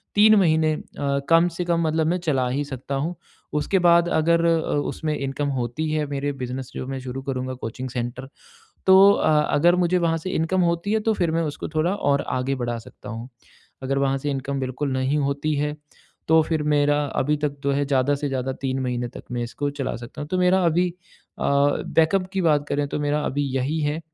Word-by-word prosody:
3 215 +1 +7
महीने 160 -3 +3
अ, 140 -2 -3
कम 165 +1 +5
से 180 - -2
कम 170 -1 +1
मतलब 160 0 +1
मैं 175 +2 +1
चला 130 -4 +2
ही 140 +3 -1
सकता 135 0 -5
हूँ। 155 +6 -2 0.4
उसके 190 +6 +1
बाद 170 -1 +4
अगर 170 +1 +2
अ, - - +4 0.4
उसमें 155 -1 -3
इनकम 140 +1 -2
होती 125 +7 -2
है, 155 -1 0
मेरे 140 0 -2
बिज़नेस, 130 +1 -5
जो - - -4
मैं 135 0 -4
शुरू 130 +1 -6
करूँगा 130 -1 -3
कोचिंग 130 +1 -6
सेंटर। 125 +1 -4 0.6
तो 190 +1 +8
अ, - - +1 0.3
अगर 170 +4 +4
मुझे 180 0 +2
वहाँ 165 -2 +1
से 185 +4 -5
इनकम 185 +2 0
होती 170 +5 -2
है, 220 - +2
तो 220 +1 +1
फिर 175 -5 0
मैं 165 +1 +1
उसको 150 -3 -4
थोड़ा 170 +5 +2
और 145 -8 +1 0.2
आगे 130 +2 -1
बढ़ा 120 -1 -2
सकता 115 - -13
हूँ। 115 +2 -6 0.5
अगर 135 +1 -1
वहाँ 135 0 +1
से 145 +2 -3
इनकम 135 0 -3
बिल्कुल 130 +2 -3
नहीं 130 +3 0
होती 145 +2 -1
है, 150 +1 -1 0.5
तो 160 0 +6
फिर 155 -1 -1
मेरा 145 0 +2
अभी 150 +3 +1
तक 145 -1 -2
जो 140 - +2
है, 140 +1 +1
ज़्यादा 135 0 +2
से 145 0 -3
ज़्यादा 130 -1 -2
3 135 -1 -1
महीने 125 -1 -2
तक - - -11
मैं 120 -1 -2
इसको 135 +4 -3
चला 140 -1 -4
सकता 120 +4 -10
हूँ। 145 - -7
तो 185 - -1
मेरा 180 +1 +3
अभी 175 +2 +2 0.5
अ, - - -3
बैकअप 160 +6 +2
की 195 - 0
बात 150 -3 +2
करें, 145 0 0
तो - - -3
मेरा 145 +1 0
अभी 145 +2 -1
यही 140 +5 -1
है 150 +1 -1
145 Hz, 215 wpm, -23 LUFS, 135-165 Hz, 0.6 s, तो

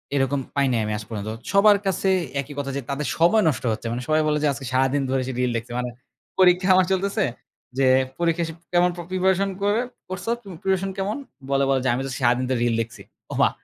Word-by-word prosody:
এরকম 135 +1 +1 0.2
পাই 140 -1 +3
নাই 115 - +1
আমি 105 - -2
আজ 105 - -7
পর্যন্ত। 105 -1 -4 0.2
সবার 205 +1 +6
কাছে 190 0 +1 0.3
একই 145 +2 -10
কথা 140 -1 -3
যে - - -2
তাদের 140 +1 -2
সময় 185 +6 +4
নষ্ট 135 - -3
হচ্ছে। 115 +1 -5
মানে 120 +1 -3
সবাই 155 0 +3
বলে 150 0 +2
যে - - +4
আজকে 135 0 -7
সারাদিন 135 +2 +2
ধরে 130 0 +1
সে - - -2
রিল 125 -1 +1
দেখছে। 115 +1 -7
মানে 125 0 -2 0.5
পরীক্ষা 185 0 +5
আমার 185 -1 +5
চলতেছে 200 +2 0 0.6
যে, 135 - +4 0.3
পরীক্ষা 170 0 +1
সে 165 - -6 0.2
কেমন 175 +1 +4 0.2
প্রিপারেশন 190 +1 +2
করে 205 +3 +2 0.3
করছ 185 0 -5 0.4
প্রিপারেশন 190 0 +1
কেমন? 200 +6 -2 0.3
বলে, 140 0 +2
বলে 135 -1 +3
যে - - +3
আমি 130 - -1
তো - - -5
সারাদিন 125 0 +2
ধরে 130 -2 +1
রিল 120 -1 +2
দেখছি। 115 +2 -7 0.3
ওমা! - - +4
145 Hz, 210 wpm, -23 LUFS, 130-185 Hz, 0.6 s, সবার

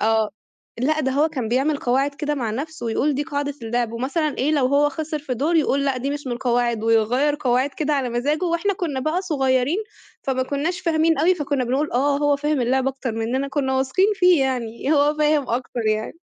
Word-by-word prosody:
آه، 220 -1 +2 0.5
لأ 310 +4 +1
ده 265 -2 0
هو 300 +4 +2
كان 250 -7 -4
بيعمل 270 +5 +1
قواعد 275 +2 0
كده 295 0 -2
مع 240 -6 -2
نفسه 290 +4 -5
ويقول 275 +6 +1
دي 285 - -1
قاعدة 285 -2 -3
اللعب. 235 0 -1
ومثلًا 285 +6 -2
إيه، 285 +4 +1
لو 285 -4 +3
هو 285 +2 +3
خسر 310 +1 -4
في 275 -4 -4
دور 310 +7 +1
يقول 280 -2 +2
لأ 275 -2 0
دي 265 +3 -2
مش 290 -1 -5
من 250 - -2
القواعد 240 -2 0
ويغيّر 240 +6 +2
قواعد 255 +2 +1
كده 300 +1 -2
على 270 -3 0
مزاجه 290 +8 0
وإحنا 340 +3 0
كُنّا 315 -8 -3
بقى 310 +7 -1
صغيرين، 270 -1 +1 0.4
فما 260 -1 0
كُنّاش 300 +7 -2
فاهمين 325 -2 +2
أوي، 350 +5 +4
فكُنّا 285 -5 -1
بنقول 270 +5 -1
آه 280 +3 +2
هو 290 -1 +2
فاهم 295 0 0
اللعبة 260 +2 +1
أكتر 265 -3 -5
منّنا، 245 +5 -2
كُنّا 270 -2 -1
واثقين 270 +9 +2
فيه 360 -5 +4
يعني، 250 +1 -2
هو 290 0 +3
فاهم 300 -2 +2
أكتر 245 0 -2
يعني. 215 0 0
280 Hz, 205 wpm, -22 LUFS, 250-300 Hz, 0.5 s, أوي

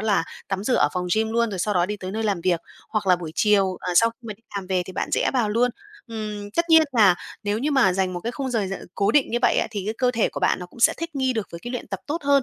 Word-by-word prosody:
là 205 -6 +1 0.2
tắm 195 0 -2
rửa 250 - +2
ở - - +4
phòng 180 -1 -2
gym 220 0 +1
luôn, 235 0 +1
rồi 190 - -4
sau 205 +3 0
đó 175 -1 +3
đi 210 +2 -3
tới 185 -2 -6
nơi 220 +3 -3
làm 200 -5 0
việc, 175 -1 +1 0.3
hoặc 215 -3 -2
là 180 - +5
buổi 165 -3 -7
chiều, 195 -3 +3
ờ, 180 - -3
sau 230 +3 +6
khi 230 - -23
mà 215 - -4
đi 220 - -31
làm 195 - -4
về 185 -1 0
thì 185 - -8
bạn - - -2
rẽ - - +2
vào 240 -5 +2
luôn. 235 +4 +2 0.4
Ừm, 210 -2 -6
tất 335 +9 -1
nhiên 320 0 +8
là 205 -5 +6 0.3
nếu 205 0 -1
như 285 +6 -1
mà 265 -10 +4
dành 190 0 0
một 175 - -4
cái 235 +6 -4
khung 265 0 -4
giờ 225 -5 0
giờ 195 - -2 0.2
cố 200 +1 +2
định 285 +2 +3
như 240 - +1
vậy - - +4
á, - - +2
thì 205 -3 -4
cái 215 - -2
cơ 250 -1 +3
thể 230 -3 +1
của - - -6
bạn - - +2
nó 180 - -7
cũng 235 - -16
sẽ - - +6
thích 335 -1 -5
nghi 260 -2 +1
được 220 -5 -3
với 170 - -6
cái 240 - -6
luyện 245 - -5
tập 195 -2 -4
tốt 310 +3 -3
hơn, 280 -1 +4
210 Hz, 325 wpm, -23 LUFS, 190-240 Hz, 0.4 s, nhiên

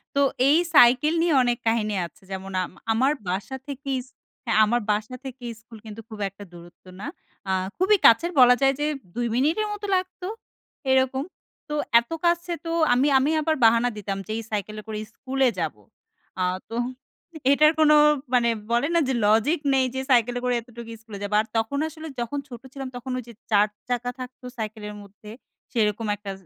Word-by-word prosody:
তো 280 - +3 0.3
এই 305 - +6 0.2
সাইকেল 260 +4 +6
নিয়ে 335 -2 +2
অনেক 240 -1 +1
কাহিনী 215 -2 +1
আছে। 205 +5 -14
যেমন 190 0 -6
আম - - -7 0.2
আমার 260 +5 +3 0.2
বাসা 200 +9 -3
থেকেই 275 -1 -3
ইছ 255 - -15 0.4
হ্যাঁ 225 - +2
আমার 240 +2 +1
বাসা 215 +4 -2
থেকে 260 -1 -8 0.2
স্কুল 230 -1 -14
কিন্তু 220 +1 -8
খুব 215 -1 -9
একটা 195 +1 -13
দূরত্ব 175 +1 -15 0.2
না। - - -5 0.4
আ - - +2 0.3
খুবই 390 +3 +4
কাছের 330 +10 +4
বলা 250 0 +8
যায় 270 0 +4
যে 295 - 0 0.3
২ 240 0 -1
মিনিটের 320 - +1
মতো 415 0 -6
লাগতো 370 0 -3 0.6
এরকম। 265 +1 +2 0.5
তো 300 - -2 0.2
এত 235 +6 -10
কাছে 345 +1 +1
তো 330 - -3 0.2
আমি 260 +4 +3
আমি 280 +4 +2
আবার 315 +1 +1
বাহানা 230 +2 +4
দিতাম 195 -1 -4
যে - - -5
এই 225 - -4
সাইকেলে 215 +1 -3
করে 215 -1 -4 0.2
স্কুলে 265 0 0
যাবো। 150 -11 -3 0.6
আ - - +3 0.3
তো 230 - -6 0.8
এটার 305 +2 +6
কোনো 300 -1 +6 0.4
মানে 235 -1 +4 0.2
বলে 240 +5 +2
না - - +5
যে 265 - 0
লজিক 225 +10 +3
নেই 260 -1 +3
যে 265 - -1
সাইকেলে 245 0 +3
করে 250 0 +1
এতটুকু 235 -1 -11
স্কুলে 220 -3 -9
যাবো। 205 - -4
আর 220 - -9
তখন 225 +5 -1
আসলে 320 0 -9
যখন 240 +5 -2
ছোট 240 -3 -10
ছিলাম 270 -2 -6
তখন 250 +1 -6
ওই 255 - -4
যে 235 - -11 0.2
৪ 210 0 +5 0.2
চাকা 245 0 -1
থাকতো 255 0 -9
সাইকেলের 215 -1 -5
মধ্যে 205 +1 -13 0.4
সেরকম 215 -1 0
১ - - -21
টা 195 - -3
245 Hz, 185 wpm, -24 LUFS, 215-275 Hz, 0.8 s, বলা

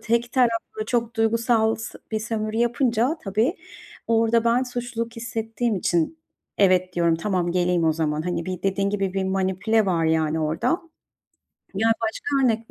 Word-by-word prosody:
tek 235 +2 0
taraflı 255 - 0
çok 235 -2 -1
duygusal 225 0 +2
s 225 - -8
bir 220 - +1
sömürü 215 0 -3
yapınca 240 +4 +1
tabii, 220 - +1 0.5
orada 230 0 +3
ben 235 +2 +3
suçluluk 240 -2 -4
hissettiğim 225 -1 -2
için: 175 - 0 0.4
"Evet.", 185 -2 +3
diyorum, 170 -1 +2
"Tamam, 180 -2 -1
geleyim 180 -2 +1
o 160 - +4
zaman." 155 -1 -1
hani, 175 -1 -2
bir 185 -1 -4
dediğin 195 0 0
gibi, 195 -2 -1
bir 190 -1 0
manipüle 190 +3 +1
var 170 -3 +1
yani 160 0 +1
orada. 155 +1 -1 1.1
Ya, 220 +4 +2
başka 275 +5 0
örnek 225 -2 0
220 Hz, 150 wpm, -24 LUFS, 185-230 Hz, 1.1 s, o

